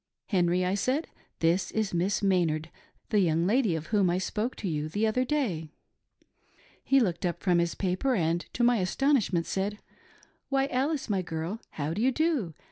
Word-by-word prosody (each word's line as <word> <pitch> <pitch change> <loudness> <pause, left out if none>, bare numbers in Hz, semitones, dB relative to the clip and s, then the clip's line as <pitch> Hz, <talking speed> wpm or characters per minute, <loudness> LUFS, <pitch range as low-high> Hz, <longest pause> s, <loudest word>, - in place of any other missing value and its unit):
Henry, 180 -2 +2
I 185 - 0
said, 255 +10 0 0.3
this 170 +2 +2
is 215 -4 -1
Miss 180 +5 0
Maynard 170 -4 +1 0.2
— - - -41
the 210 - +4
young 165 -2 +2
lady 215 -3 +2
of 160 -1 -4
whom 200 -4 +4
I 175 - +1
spoke 210 +6 -2
to 200 - -5
you 155 -2 -2
the 210 +7 0
other 220 +4 +1
day. 240 - -1 1.1
He 270 - +4
looked 185 -8 0
up 175 -2 -2
from 180 -3 +3
his 170 -1 0
paper, 195 +8 0
and, 170 -2 +1
to 240 - 0
my 240 0 +4
astonishment, 195 - +1
said, 195 +4 -2 0.4
' - - -31
Why, 270 -1 +2
Alice, 275 +3 0
my 200 -4 0
girl, 170 +5 -4
how 150 +1 -2
do 210 - -2
you 260 +3 +3
do 270 - 0
190 Hz, 190 wpm, -28 LUFS, 170-240 Hz, 1.1 s, the